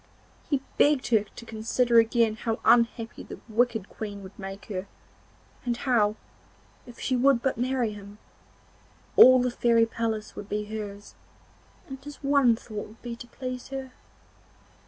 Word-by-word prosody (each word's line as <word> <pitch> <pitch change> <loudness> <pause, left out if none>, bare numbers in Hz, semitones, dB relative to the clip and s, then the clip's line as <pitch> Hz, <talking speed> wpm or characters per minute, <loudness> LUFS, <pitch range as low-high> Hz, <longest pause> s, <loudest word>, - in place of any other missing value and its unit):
He 280 -3 +1 0.2
begged 290 -3 +3
her 220 -3 +3
to 235 - -10
consider 230 +2 +2
again 225 -1 +2
how 225 0 -3
unhappy 230 -1 +3
the - - -9
wicked 225 -2 +1
Queen 205 -2 -7
would 190 +2 -13
make 195 +1 -7
her, 195 -2 -5 0.8
and 240 -1 -1
how, 225 -5 +2 0.7
if 240 - -13
she 260 - 0
would 250 -1 +3
but 265 - +1
marry 250 -2 0
him, 205 0 -11 1.0
all 255 +1 +9
the 250 0 +1
fairy 235 -1 +3
palace 225 -2 -3
would 200 - -8
be 210 0 -2
hers, 205 -1 -7 0.7
and 270 -1 -9
his 290 0 -8
one 275 -4 +4
thought 215 -2 -7
would 220 +2 -18
be 240 -1 -5
to 240 - -11
please 255 +1 -6
her. 270 -1 -6
230 Hz, 155 wpm, -27 LUFS, 215-250 Hz, 1.0 s, all